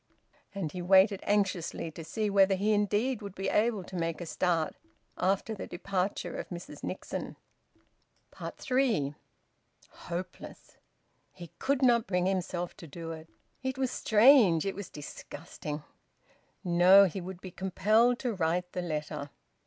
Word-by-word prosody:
And 175 -6 -3
he 180 - -5
waited 190 +2 +5
anxiously 190 -5 0
to 165 - -9
see 210 +7 -2
whether 195 -1 +4
he 205 +3 +1
indeed 210 +4 +1
would 200 -2 -8
be 195 - -2
able 215 -2 +1
to 185 - -10
make 165 -2 -2
a 175 - -5
start 165 -1 0 0.4
after 195 +4 0
the 210 - -6
departure 190 +1 -3
of - - -6
Mrs 175 -1 -8
Nixon. - - -5 1.2
THREE. 240 - +1 0.8
Hopeless! 175 +2 -8 0.5
He 170 -3 -11
could 275 0 +1
not 235 -3 +4
bring 180 -1 +1
himself 180 -2 -2
to 165 - -10
do 165 +2 -7
it. 160 0 -9 0.3
It 260 -1 -3
was 260 -2 0
strange! 215 - +5
It 195 - -1
was 200 -2 -7
disgusting!... 150 0 -8 0.8
No, 180 +3 +7
he 190 +1 -3
would 180 0 -7
be 185 0 -9
compelled 215 +7 +2
to 245 -3 -1
write 180 0 -1
the 180 - -3
letter. 150 -3 -4
185 Hz, 145 wpm, -30 LUFS, 170-210 Hz, 1.2 s, No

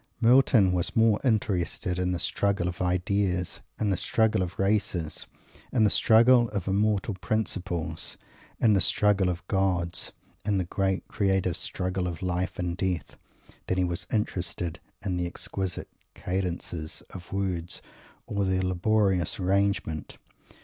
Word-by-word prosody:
Milton 120 -5 +5
was 90 -1 -1
more 110 -2 +4
interested 95 -6 0
in 90 0 0
the 90 - 0
struggle 100 0 0
of 90 - -4
ideas, 90 0 0 0.2
in 105 -2 +1
the - - +2
struggle 110 +2 +2
of 90 -1 -3
races, 95 -5 0 0.4
in 120 -4 +3
the 105 - +4
struggle 120 +1 +5
of 100 -4 -4
immortal 105 +1 +1
principles, 95 -4 -2 0.4
in 110 -2 +5
the 100 - +3
struggle 105 -3 +3
of 90 -1 -4
gods, 90 -3 0 0.3
in 105 -1 +1
the 95 - +1
great 95 +1 -1
creative 95 -4 +1
struggle 90 0 -2
of 85 0 -5
life 90 0 -1
and 90 -1 -2
death, 90 -7 -2 0.5
than 95 - 0
he 95 - +3
was 85 -1 -2
interested 90 -5 -2 0.3
in 90 -3 -1
the 90 0 -1
exquisite 95 0 -4 0.2
cadences 90 -3 -3
of 90 -2 -10
words 90 -3 -2 0.4
or 100 -1 -1
their 95 -1 +1
laborious 95 0 +1
arrangement. 95 -4 0
95 Hz, 140 wpm, -27 LUFS, 90-100 Hz, 0.5 s, Milton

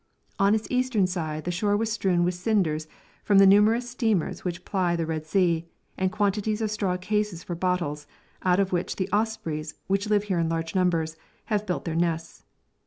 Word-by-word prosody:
On 200 +2 +4
its 220 - -2
eastern 250 -6 +2
side 160 -4 -3
the 175 - -2
shore 205 +4 +1
was 225 +1 -1
strewn 185 -5 +1
with 180 +1 +1
cinders 175 -5 0 0.4
from 205 - +3
the 195 - +8
numerous 215 +5 +5
steamers 225 -8 -1
which 180 0 -4
ply 180 -3 0
the 165 -1 -1
Red 155 -1 -4
Sea, 170 -2 +1 0.3
and 185 0 0
quantities 210 +1 0
of 220 -2 -1
straw 195 -4 -1
cases 210 -1 -2
for 175 - -5
bottles, 170 -5 -1 0.3
out 180 0 +3
of 195 -1 +1
which 175 0 -1
the 190 0 -2
ospreys, 170 -8 -1
which 195 +2 0
live 205 -1 +3
here 190 -4 -1
in 165 -1 +1
large 165 0 -2
numbers, 165 -4 +1 0.3
have 210 -2 -1
built 180 - -2
their 165 - -2
nests. 165 -1 -2
185 Hz, 190 wpm, -26 LUFS, 170-210 Hz, 0.4 s, the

